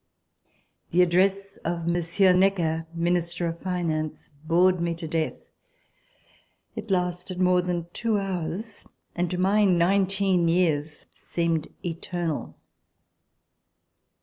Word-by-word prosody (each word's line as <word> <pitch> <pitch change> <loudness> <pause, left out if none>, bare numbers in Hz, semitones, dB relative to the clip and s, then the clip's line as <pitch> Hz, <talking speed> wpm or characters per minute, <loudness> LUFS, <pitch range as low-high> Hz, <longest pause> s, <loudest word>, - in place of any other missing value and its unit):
The 180 +2 +4
address 195 +3 +1
of 170 0 -3
Monsieur 175 +2 +3
Necker, 175 -4 +2
Minister 170 0 -1
of 165 0 -3
Finance, 160 -5 -3
bored 180 +2 +3
me 170 -1 -1
to 165 -1 -6
death. 160 0 -3 1.3
It - - -6
lasted 180 0 -1
more 180 -1 +4
than 175 -2 -2
two 225 -2 0
hours 195 +2 -3 0.3
and, 175 0 0
to 180 - -3
my 195 +3 +3
nineteen 190 0 +3
years, 160 -3 0
seemed 165 -2 -2 0.2
eternal. 170 -1 -3
175 Hz, 105 wpm, -26 LUFS, 165-185 Hz, 1.3 s, The